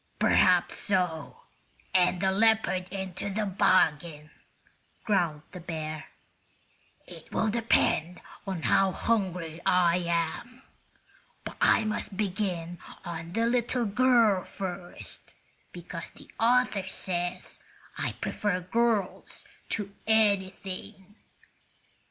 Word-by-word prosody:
"Perhaps - - +4
so, 180 -6 -1 0.5
and 180 0 +3
a 190 - +3
leopard 215 -3 +2
into 190 0 -4
the 210 +2 -1
bargain," 160 -5 +2 0.7
growled 170 -8 +1
the 180 - -8
bear. 155 -2 -5 1.0
"It - - -13
will 220 - +1
depend 190 -6 +1 0.3
on 185 -4 -3
how 195 -1 +3
hungry 180 -7 -1
I 180 -1 +4
am. 170 +9 -2 0.8
But - - -7
I - - +5
must 215 -2 -3
begin 180 -4 -2 0.3
on 170 0 -6
the 230 +2 +1
little 240 0 +1
girl 225 -3 +4
first, 180 -2 -7 0.4
because 170 -1 -8
the - - -16
author 230 -5 +2
says 180 -1 -3 0.4
I - - -2
prefer 205 -3 -2
girls 215 +1 -1 0.2
to 200 -2 -3
anything." 200 -2 0
190 Hz, 100 wpm, -28 LUFS, 175-215 Hz, 1.0 s, I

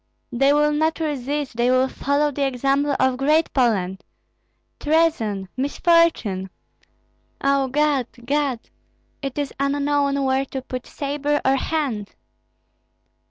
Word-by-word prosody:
They 275 +3 +3
will 295 +1 +3
not 315 +2 0
resist, 290 -3 -3
they 240 +1 +2
will 255 +1 +3
follow 285 +3 0
the 280 0 -2
example 275 +2 0
of 260 -1 +2
Great 305 +4 +2
Poland! 195 -8 +1 0.8
Treason! 295 - +1
misfortune! 280 - +2 0.9
O 275 -1 +2
God, 285 -2 +1 0.2
God! 280 -2 0 0.6
It 275 -1 -5
is 285 -2 -2
unknown 280 0 +1
where 265 +1 +1
to 265 0 -5
put 255 -1 -6
sabre 290 +1 -1
or 265 +1 +4
hand!" 270 -8 -2
275 Hz, 115 wpm, -22 LUFS, 255-295 Hz, 0.9 s, or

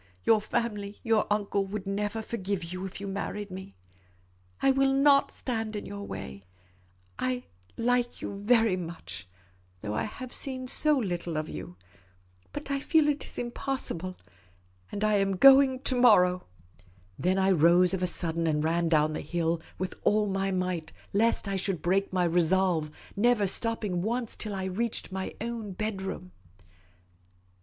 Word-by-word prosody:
Your 220 -2 +4
family, 210 -3 -3
your 225 -2 +2
uncle, 205 -1 +1
would 200 0 -5
never 205 +3 -2
forgive 200 -5 -3
you 185 +3 -5
if 190 - -9
you 200 - -6
married 200 +1 -4
me. 185 - -8 0.8
I 270 - +4
will 270 0 +3
not 275 0 +5
stand 225 -3 -3
in 205 - -4
your 200 0 -7
way. 100 - -7 0.8
I 255 - 0 0.3
— 90 0 -33
I - - -4
like 245 0 +1
you - - -5
very 220 0 +3
much, 170 - -7 0.5
though 105 -1 -4
I - - -1
have 255 +4 -8
seen 260 -2 -3
so 300 +3 +3
little 175 -7 -2
of 155 0 -3
you. 90 - -7 0.8
But 280 - -6
I 275 - 0
feel 310 +1 +3
it 295 0 -1
is - - -7
impossible 240 -7 -3 0.4
— 90 0 -34
and 205 - -3
I 215 -1 +3
am 195 -1 +1
going 270 +1 +7
to 255 -2 0
morrow." 180 -7 +5 0.7
Then 185 +2 +1
I 190 0 +3
rose 175 +2 +5
of 190 - -1
a 180 - +2
sudden, 165 -1 -1
and 150 -1 +1
ran 165 +1 +1
down 155 -1 +3
the - - -3
hill 165 +1 -1 0.2
with 185 +1 -3
all 210 0 +3
my 195 -1 -1
might, 180 -4 -2 0.2
lest 220 +1 +2
I 195 -1 -1
should 190 -4 -2
break 195 +3 +1
my 185 -1 +1
resolve, 175 -1 +2 0.3
never 220 0 +3
stopping 205 -2 -1
once 235 +3 -2
till 210 -2 -4
I 190 - -3
reached 200 +3 -2
my 190 0 -4
own 225 -3 -4
bedroom. 190 -3 -4
195 Hz, 165 wpm, -28 LUFS, 180-230 Hz, 0.8 s, going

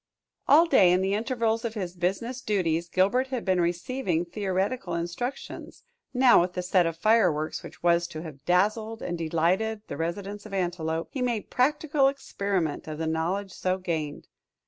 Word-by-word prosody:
All 315 +4 +7
day, 190 - +5
in 180 +1 +3
the 190 +1 0
intervals 230 0 0
of 230 -1 -3
his 185 -4 -4
business 195 +9 -2
duties, 170 -6 0
Gilbert 200 +10 +2
had 255 -3 -4
been 185 -2 +2
receiving 175 +1 -1
theoretical 190 +1 -2
instructions; 175 +11 -5 0.3
now 250 -6 +6
with 180 +1 -1
the 180 - -3
set 180 -1 +3
of 165 -1 -4
fireworks 180 -7 +2
which - - -12
was 170 0 +3
to 155 -1 -7
have 145 -5 -10
dazzled 215 +6 +1
and 175 - -2
delighted 175 +7 0
the 145 - -6
residents 200 +6 -4
of 195 - -6
Antelope, 170 -3 -2
he 265 - -4
made 240 -4 -2
practical 290 +2 +2
experiment 200 - -2
of 155 -1 -5
the 160 - -2
knowledge 175 +5 -1
so 185 +1 -1
gained. 160 -5 -4
185 Hz, 170 wpm, -27 LUFS, 170-225 Hz, 0.3 s, All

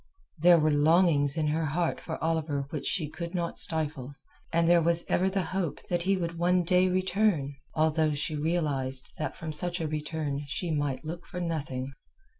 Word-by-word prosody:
There 175 +2 +7
were 155 -1 +2
longings 150 -1 +3
in 155 - +1
her 160 +1 0
heart 165 +3 -1
for 160 - -5
Oliver 155 -4 -1
which 150 - -3
she 165 -6 +1
could 170 +4 -6
not 170 -1 -2
stifle, 150 -4 -1 0.4
and 170 0 +2
there 170 0 +5
was 170 +1 +2
ever 185 +2 +2
the 190 -1 -1
hope 180 -3 -3
that 175 -1 0
he 195 +2 +1
would 170 -2 -4
one 180 +1 +3
day 180 +1 +3
return, 185 -5 +1 0.2
although 155 -1 +2
she 145 +2 -2
realized 145 -5 0
that - - -3
from 160 -1 -5
such 175 +3 0
a 160 - -1
return 150 -1 -3
she 165 +4 -3
might 145 -1 -2
look 170 +3 -6
for 180 - -6
nothing. 140 -6 -3
160 Hz, 185 wpm, -28 LUFS, 150-175 Hz, 0.4 s, There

